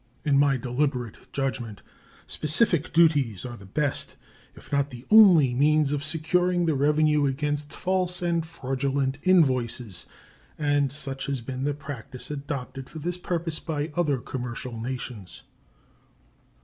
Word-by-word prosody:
In 145 -2 +3
my 140 -1 +4
deliberate 125 -2 -3
judgment 120 -6 -3 0.4
specific 165 +1 +1
duties 145 - +3
are 120 -1 -6
the 100 -4 -13
best, 145 +7 -1 0.4
if - - -16
not 140 0 +1
the 125 -1 -11
only, 180 - +7
means 150 +2 +3
of 145 -1 -2
securing 175 +3 +1
the 160 - +2
revenue 150 +1 +3
against 145 +2 -2
false 180 -1 -1
and 170 -2 0
fraudulent 135 -3 -2
invoices, 130 - +1 0.5
and 145 -2 +1
such 135 -1 -5
has 140 -3 -2
been 130 +2 -4
the 145 -1 0
practice 135 -2 -8
adopted 140 -2 -5
for - - -10
this 175 +3 -4
purpose 170 -3 -2
by 150 -2 -3
other 155 -6 +1
commercial 125 -1 -5
nations. 120 -5 -6
145 Hz, 135 wpm, -26 LUFS, 130-155 Hz, 0.5 s, only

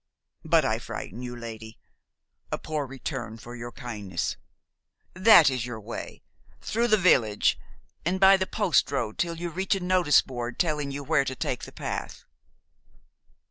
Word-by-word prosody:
But - - +3
I - - 0
frighten 115 +7 -7
you, 120 -1 -6
lady, 110 -2 -8 0.7
a - - 0
poor 150 -3 -3
return 130 -4 -6
for 120 +2 -10
your 120 0 -7
kindness. 105 -9 -4 0.8
That 185 -6 +7
is 125 -2 -2
your 120 -2 -6
way, 110 +2 -8 0.4
through 235 +2 0
the 215 -2 +4
village, 120 - +3 0.4
and 180 +3 0
by 195 0 +8
the 190 -1 -1
postroad 140 - 0
till 170 -1 0
you 170 +1 -5
reach 190 +4 0
a - - -2
notice 180 -4 +4
board 120 -2 -5
telling 150 -4 0
you 140 +1 -5
where 150 -1 +2
to 130 - -3
take - - -3
the - - -11
path." - - -5
140 Hz, 155 wpm, -27 LUFS, 120-175 Hz, 0.8 s, by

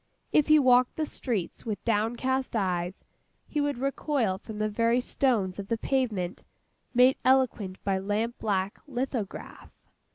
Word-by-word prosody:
If 300 - +4
he 310 0 +7
walked 255 -3 +4
the 315 - -1
streets 225 - -3
with 215 -3 -5
downcast 240 +4 0
eyes, 185 -2 -1 0.4
he 300 - -1
would 285 -3 -1
recoil 265 -6 0
from 215 0 -9
the 215 0 0
very 230 +3 +2
stones 225 -8 0
of 195 - -5
the 230 - 0
pavement, 220 -9 -1 0.5
made 255 +1 +5
eloquent 255 -8 +2
by 195 -1 0
lamp 210 +5 -2
black 195 -2 -1
lithograph. 250 -6 -4
230 Hz, 140 wpm, -28 LUFS, 200-260 Hz, 0.5 s, he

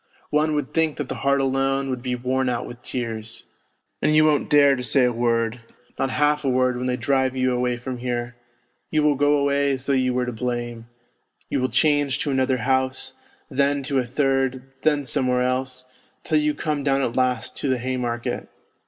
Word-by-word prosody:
One 150 +1 +2
would 145 - -3
think 160 -2 +1
that 145 -3 -4
the - - -4
heart 140 0 +2
alone 135 0 0
would 125 -1 -3
be 125 0 -2
worn 130 +1 0
out 120 -1 -2
with 120 0 -10
tears. 115 -3 -4 0.6
And 155 - +3
you 155 0 +6
won't 150 -2 +2
dare 140 -2 +6
to 125 - -5
say 125 +2 +3
a 125 - +2
word, 115 0 0 0.4
not 135 - +1
half 150 +2 +1
a 135 - +1
word 130 0 +2
when 125 +1 -3
they 125 0 0
drive 130 +1 +1
you 130 -1 +1
away 125 0 0
from 125 +1 -6
here; 120 -1 -3 0.5
you 155 -1 +1
will 150 -1 +4
go 145 +1 +3
away 140 0 +2
as 130 0 -4
though 140 - +1
j'ou 130 -1 +2
were 125 0 0
to 125 - -3
blame. 120 -1 -4 0.6
You - - +1
will 130 - +1
change 145 -4 +2
to 145 - -1
another 130 -1 +1
house, 130 0 0 0.3
then 140 +1 +1
to 135 0 0
a - - +1
third, 135 0 0 0.2
then 150 -2 +2
somewhere 125 0 +1
else, 130 0 -2 0.4
till 155 - +2
you 150 0 +1
come 150 -1 -2
down 135 -1 +2
at 120 - -2
last 125 -2 0
to 140 - -1
the 130 - +2
Haymarket. 120 -1 -3
130 Hz, 205 wpm, -23 LUFS, 125-140 Hz, 0.6 s, you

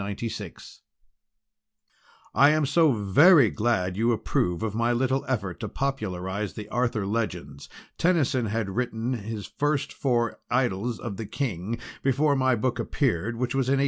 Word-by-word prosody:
"DEAR, 110 -5 -5 1.8
"I 140 - +6
am 155 -1 +2
so 155 +2 +4
very 120 - +5
glad 100 -5 0
you 115 +4 +2
approve 90 -4 -1
of 110 -2 -2
my 115 +2 +1
little 130 +2 +1
effort 100 -9 -2
to 110 - -4
popularise 100 -6 -3
the 105 -1 -7
Arthur 120 -4 0
Legends. 95 -9 -4 0.3
Tennyson 145 -9 +2
had 105 -1 -2
written 120 +2 -2
his 110 -2 -5
first 145 -1 -1
four 120 -3 0
'Idylls 120 -2 0
of 105 -5 -6
the 110 - -5
King' 115 - -3 0.2
before 140 +2 +2
my 130 -2 +2
book 125 +2 -1
appeared, 115 - -1
which 125 +1 -2
was 135 -2 0
in - - +4
1861. 135 - +2
115 Hz, 150 wpm, -26 LUFS, 105-130 Hz, 1.8 s, I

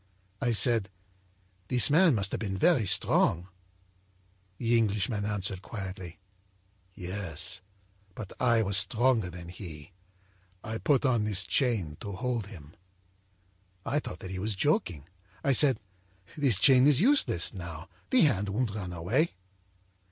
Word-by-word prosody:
âI 120 -1 +1
said: 115 -4 +3 0.8
â'This 125 +2 +3
man 165 -2 +5
must 100 -2 0
have - - -3
been 95 -3 -3
very 145 - +3
strong.' 90 0 +2 1.1
âThe 115 -1 -1
Englishman 105 -1 0
answered 100 -2 -1
quietly: 95 -5 -8 0.8
â'Yes, 90 -1 -4 0.5
but 105 -4 -8
I 115 -3 +3
was 100 -1 +2
stronger 110 +1 +2
than 85 -1 -10
he. 85 -4 -10 0.7
I 110 +1 -5
put 145 -1 +1
on 120 -5 +2
this 100 -2 +3
chain 105 - 0
to 100 - -6
hold 120 0 -3
him.' 80 -7 -12 1.1
âI 150 - 0
thought 125 - -8
that 95 - -7
he 95 - -5
was 105 +2 -2
joking. 95 - -1 0.4
I 140 - +2
said: 135 -2 +3 0.6
â'This 135 - +2
chain 130 +3 +6
is 145 -3 +4
useless 235 - +2
now, 85 -4 -8 0.2
the 255 - +4
hand 105 -9 +2
won't 110 +1 -1
run 95 -4 -5
away.' 115 - 0
105 Hz, 135 wpm, -28 LUFS, 95-125 Hz, 1.1 s, chain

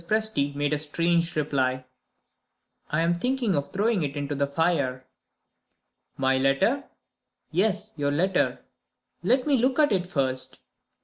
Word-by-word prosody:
Presty 215 -11 +1
made 145 +1 0
a 150 - 0
strange 170 +2 0
reply. 130 -4 0 1.0
"I 155 +2 +1
am 170 +1 +2
thinking 245 +3 0
of 140 -2 -1
throwing 210 0 +1
it 145 -1 -3
into 145 0 -3
the 140 0 0
fire." 140 -4 0 1.1
"My 135 0 +2
letter?" 140 - +2 0.7
"Yes; 205 +4 0
your 145 -1 0
letter." 180 +7 +1 0.6
"Let 255 0 +2
me 285 -3 +3
look 255 +3 +1
at 300 -5 +4
it 185 -3 0
first." 130 -6 -2
165 Hz, 135 wpm, -26 LUFS, 140-210 Hz, 1.1 s, at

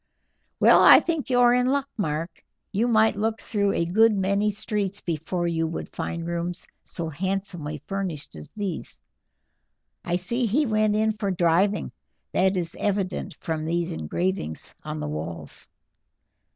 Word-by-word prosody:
"Well, - - +7
I - - +10
think 325 -5 -2
you 250 -1 +3
are 240 0 +6
in 250 0 +3
luck, 275 +1 +1
Mark; 165 -3 -3 0.3
you 215 +4 +1
might 220 -2 +4
look 220 +2 -1
through 200 -1 0
a 170 - +1
good 220 +6 +4
many 200 +1 +1
streets 205 -1 -2
before 175 +1 -2
you 165 -1 0
would 165 - -6
find 170 0 -3
rooms 170 +1 -3 0.2
so 165 -2 -5
fashionably 175 -3 -3
furnished 185 - -3
as 75 -1 -9
these. 200 -6 -4 1.0
I 175 - -1
see 235 +7 -1
he 280 +9 +2
went 215 -2 +2
in 220 +1 +2
for 210 -2 -3
driving; 185 +3 +2 0.4
that 190 +1 +2
is 170 -2 -3
evident 195 -2 -1
from 160 -1 -3
these 170 +1 -1
engravings 80 - -3
on 75 - -5
the 75 - -3
walls." 75 0 -5
190 Hz, 150 wpm, -25 LUFS, 165-215 Hz, 1.0 s, I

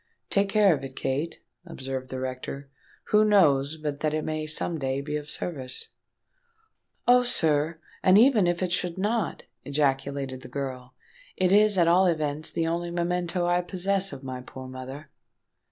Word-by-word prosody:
"Take 200 0 +2
care 205 -3 +5
of 140 - -4
it, 135 -1 -8
Kate," 140 +5 -3 0.2
observed 130 -6 -6
the 130 - -4
rector; 130 +2 -6 0.4
"who 210 0 +5
knows 155 -8 +4
but 150 -2 -4
that 155 -1 0
it 155 - -1
may 155 0 -3
some 160 +1 -1
day 135 0 -1
be 150 +2 -4
of 150 0 -5
service?" 130 -7 -3 1.2
"Oh! 250 0 +7
sir, 160 -8 +1 0.2
and 185 +1 +6
even 225 -5 +5
if 175 +1 0
it 180 - -1
should 175 0 -1
not," 210 +1 -1 0.2
ejaculated 140 -2 -1
the - - -10
girl, 130 -1 -6 0.4
"it 185 -1 +2
is 210 0 +5
at 170 -2 +4
all 180 +2 +5
events 155 -2 -1
the 165 - -1
only 170 +1 -1
memento 175 0 -1
I 175 0 +2
possess 195 +2 0
of 135 - -9
my 130 -1 -5
poor 130 +1 -10
mother." 130 +3 -9
155 Hz, 170 wpm, -26 LUFS, 135-180 Hz, 1.2 s, Oh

